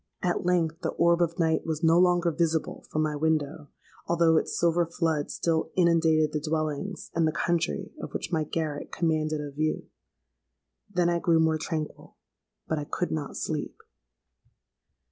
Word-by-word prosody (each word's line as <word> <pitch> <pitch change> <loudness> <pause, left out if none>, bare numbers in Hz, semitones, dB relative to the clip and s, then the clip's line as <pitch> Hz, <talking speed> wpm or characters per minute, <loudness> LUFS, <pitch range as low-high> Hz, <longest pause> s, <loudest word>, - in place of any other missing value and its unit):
"At 175 -1 0
length 170 -2 +1
the - - -1
orb 170 0 +3
of 170 0 +1
night 160 -2 +2
was 160 0 -3
no 165 +1 +5
longer 175 -1 +3
visible 165 -1 -1
from 155 - 0
my 155 -1 -1
window, 150 -1 -1 0.4
although 170 -1 +4
its - - 0
silver 170 0 +3
flood 165 -3 -1
still 160 -1 0
inundated 160 -3 +3
the 150 - 0
dwellings 155 +4 -3
and 165 -1 +2
the - - +1
country 165 - -1
of - - -6
which - - -4
my 160 -2 +1
garret 150 -1 -3
commanded 155 -2 0
a 145 -1 -5
view. 155 +2 -1 1.1
Then 180 -3 +2
I 170 0 +1
grew 170 -1 +3
more 160 -1 +2
tranquil:—but 155 0 -6
I - - -3
could 180 - -2
not 150 -3 -3
sleep! - - -3
160 Hz, 160 wpm, -27 LUFS, 155-170 Hz, 1.1 s, no